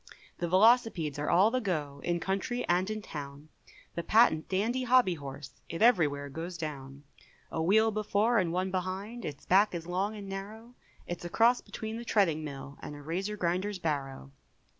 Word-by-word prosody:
The 175 - -1
Velocipedes 185 - +3
are 150 - -1
all 195 +6 +5
the 255 +1 0
go, 150 -8 -3
In 175 0 0
country 195 +8 -2
and 180 +3 +2
in 215 -1 -4
town, 145 -1 -8 0.4
The 170 - -3
patent 190 -5 +3
dandy 220 +7 0
hobby 250 -6 +4
horse 140 -2 -9
It 165 +5 -1
every 215 -10 +6
where 145 0 -5
goes 165 +5 -6
down; 140 -3 -7 0.5
A 160 - -2
wheel 220 +6 +4
before 215 +2 +2
and 175 -4 0
one 185 +2 -1
behind, 190 +5 -4
Its 140 -1 -7
back 195 +1 +4
is 165 -1 -5
long 190 +5 -1
and 205 -2 -8
narrow, 210 +5 -7 0.3
It's 175 - -6
a 175 - -5
cross 235 +6 +4
between 220 0 -6
the 235 - -6
treading 180 -9 +2
mill, 140 -1 -8
And 150 - -7
a 145 - -10
Razor 190 +7 -3
Grinder's 185 +3 -1
barrow. 140 -5 -3
185 Hz, 180 wpm, -30 LUFS, 155-215 Hz, 0.5 s, every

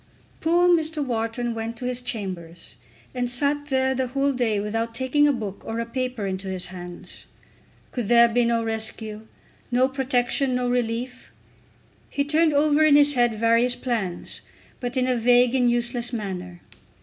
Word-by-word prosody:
Poor 345 +2 +3
Mr. 320 -4 +2
Wharton 235 0 -2
went 225 0 -5
to 250 - -6
his 250 0 -1
chambers, 185 -8 -4 0.4
and 250 -1 -2
sat 285 +4 0
there 265 -1 +1
the 260 0 -1
whole 275 +2 0
day 235 -5 0
without 225 +2 -3
taking 260 +4 +2
a - - +4
book 210 -7 -5
or 225 +1 -4
a 230 - -2
paper 255 -2 -3
into 190 0 -4
his 185 -1 0
hands. 175 -1 -8 0.6
Could 240 -5 -3
there 235 +1 +6
be 240 +1 +2
no 235 -1 +1
rescue, 220 -1 -5 0.4
no 250 +1 +3
protection, 260 0 0
no 250 0 0
relief! 245 +1 -2 0.8
He 280 - -1
turned 310 +2 +2
over 295 +1 +3
in 305 -2 +6
his 290 0 +6
head 240 -3 +2
various 230 +2 +3
plans, 210 -9 -3 0.4
but 245 +1 -4
in 255 - +2
a 255 - +2
vague 245 +1 +4
and 250 -2 +3
useless 240 0 +1
manner. 180 -6 -5
245 Hz, 165 wpm, -24 LUFS, 225-260 Hz, 0.8 s, there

